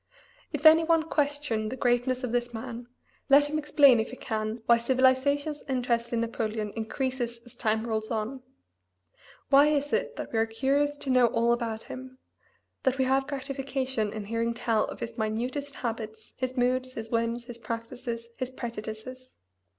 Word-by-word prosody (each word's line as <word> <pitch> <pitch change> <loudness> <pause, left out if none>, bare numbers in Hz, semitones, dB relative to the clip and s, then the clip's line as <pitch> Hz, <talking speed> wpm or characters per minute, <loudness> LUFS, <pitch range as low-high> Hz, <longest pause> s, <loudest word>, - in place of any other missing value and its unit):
If 295 0 -4
any 320 +1 +9
one 325 -1 +3
question 290 -8 -1
the 255 - -4
greatness 250 +1 +1
of 250 - -2
this 240 0 -1
man 235 +1 -6 0.4
let 285 +1 +7
him 305 - 0
explain 285 -4 +6
if 220 - -1
he - - -8
can 220 -1 -3
why 235 0 +5
civilization's 260 +4 +2
interest 240 -2 0
in 235 -1 +1
Napoleon 220 -2 -2
increases 240 +1 -2
as 240 - -14
time 220 +1 0
rolls 220 -1 -2
on. 230 +4 -3 1.1
Why 280 +2 +7
is 290 -1 +1
it 480 0 0
that - - -6
we 225 - +2
are 225 - +2
curious 280 +5 +1
to 270 - -3
know 250 -2 +6
all 235 +1 +2
about 230 -2 -3
him 260 0 -9 0.6
that 265 0 +1
we 260 - +2
have 270 +1 +2
gratification 265 -5 -2
in 215 -1 -5
hearing 230 +2 -1
tell 225 -1 +1
of - - -8
his 230 - -5
minutest 250 +6 -2
habits, 220 -2 -5
his 255 0 -3
moods, 255 +1 +1
his 225 0 -6
whims, 230 +1 0
his 240 -1 -9
practices, 230 +1 -5
his 255 - -3
prejudices? 240 +1 -7
245 Hz, 170 wpm, -28 LUFS, 230-270 Hz, 1.1 s, any